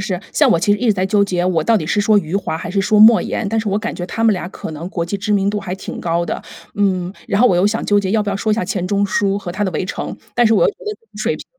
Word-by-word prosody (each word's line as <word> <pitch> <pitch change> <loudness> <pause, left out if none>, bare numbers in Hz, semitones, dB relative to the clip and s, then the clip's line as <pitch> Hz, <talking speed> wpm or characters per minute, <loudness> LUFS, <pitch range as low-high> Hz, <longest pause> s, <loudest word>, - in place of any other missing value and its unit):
是。 190 -2 -3
像 - - +4
我 170 - +4
其 205 +4 +2
实 205 - 0
一 245 - -1
直 215 - +5
在 185 -1 -1
纠 200 +1 +2
结， 180 -2 -1
我 170 -4 +1
到 230 - +3
底 155 -7 -2
是 205 - +1
说 205 0 +4
余 175 +1 -2
华 160 -5 -3
还 170 - -6
是 195 +1 0
说 210 +2 +2
莫 220 +1 +8
言， 220 - -3
但 225 +1 0
是 215 -1 -1
我 200 - 0
感 225 +2 -4
觉 175 - -5
他 225 - -4
们 225 -2 +5
俩 180 -2 -4
可 175 - -8
能 160 +3 -6
国 170 -3 -3
际 200 +4 -3
知 210 +1 -2
名 200 -1 +2
度 210 - -2
还 180 -2 -5
挺 190 - -7
高 170 0 0
的。 - - -4 0.3
嗯， 185 -3 0
然 200 - 0
后 250 - +6
我 180 - +2
又 185 +3 +3
想 220 +2 -1
纠 205 0 +3
结 190 -1 -1
要 215 -1 +2
不 205 - -3
要 195 - -1
说 215 +1 0
一 - - +3
下 220 - -2
钱 185 -1 -2
钟 200 +1 +1
书 200 0 0
和 195 -3 -6
他 200 +4 -2
的 190 - -1
《围 - - -1
城》， - - -5 0.2
但 240 -1 +4
是 225 - +3
我 - - +3
又 - - +4
觉 - - -21
得 425 - -3 0.2
水 - - -1
平 - - -11
200 Hz, 370 characters per minute, -18 LUFS, 180-210 Hz, 0.3 s, 莫